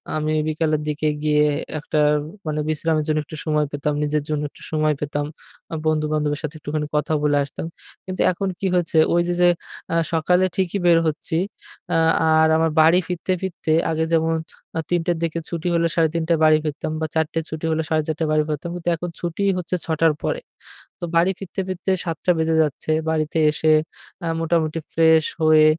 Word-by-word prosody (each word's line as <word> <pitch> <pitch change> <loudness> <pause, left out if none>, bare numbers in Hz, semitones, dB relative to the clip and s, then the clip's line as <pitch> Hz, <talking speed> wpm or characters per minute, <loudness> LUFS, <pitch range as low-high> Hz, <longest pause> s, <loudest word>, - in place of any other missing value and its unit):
আমি 155 0 -1 0.2
বিকালের 155 -1 0
দিকে 150 +1 -1 0.2
গিয়ে 150 -1 +3 0.4
একটা 150 +1 -1 0.5
মানে 155 0 -1
বিশ্রামের 155 0 0
জন্য 155 0 +1
একটু 155 - -9
সময় 150 -1 +2
পেতাম। 145 +1 -1
নিজের 150 0 0
জন্য 150 -1 0
একটু - - -19
সময় 155 -1 +2
পেতাম। 145 0 -2 0.5
আ - - -1
বন্ধু-বান্ধবের 150 -1 0
সাথে 155 +1 -4
একটুখানি 150 +1 -3
কথা 150 +1 +1
বলে 145 -1 +3
আসতাম। 140 - -6 0.4
কিন্তু 185 - -3
এখন 195 +2 -3
কি 195 - 0
হয়েছে 170 -2 +1 0.2
ওই 175 - +4
যে 175 - 0
যে 175 - +6 0.4
আ - - +2 0.2
সকালে 180 +3 +3
ঠিকই 190 +1 0
বের 170 -1 +6
হচ্ছি। 155 +1 -2 0.6
আ - - +3 0.3
আর 160 0 +5
আমার 160 -1 +2
বাড়ি 165 +3 +6
ফিরতে, 180 +1 -3
ফিরতে 170 -4 -2 0.2
আগে 160 0 0
যেমন 165 0 +2 0.4
আ - - +1
০৩ঃ০০ 175 0 +1
র - - -6
দিকে 165 0 -1
ছুটি 170 0 -3
হলে 170 0 +3
৩:৩০য় 165 0 +1
বাড়ি 155 0 +6
ফিরতাম 150 +1 -3
বা - - +1
০৪ঃ০০ 160 +1 0
ছুটি 160 +1 -5
হলে 160 0 0
৪:৩০ 155 0 0
য় 155 - -2
বাড়ি 155 0 +3
ফিরতাম। 150 +3 -3
কিন্তু 175 0 -2
এখন 175 +2 -5
ছুটিই 195 +3 0
হচ্ছে 180 0 -2
০৬ঃ০০ 160 0 0
র - - -3
পরে। - - -1 0.6
তো - - -11
বাড়ি 175 +3 +4
ফিরতে 195 0 -4
ফিরতে 185 +1 -2
০৭ঃ০০ 165 +2 0
বেজে 160 0 +1
যাচ্ছে। 150 +1 -3 0.2
বাড়িতে 155 0 -1
এসে 155 +1 0 0.6
আ - - -1
মোটামুটি 165 -1 0
ফ্রেশ 160 -1 +5 0.2
হয়ে 155 -1 +6
160 Hz, 185 wpm, -22 LUFS, 155-170 Hz, 0.6 s, যে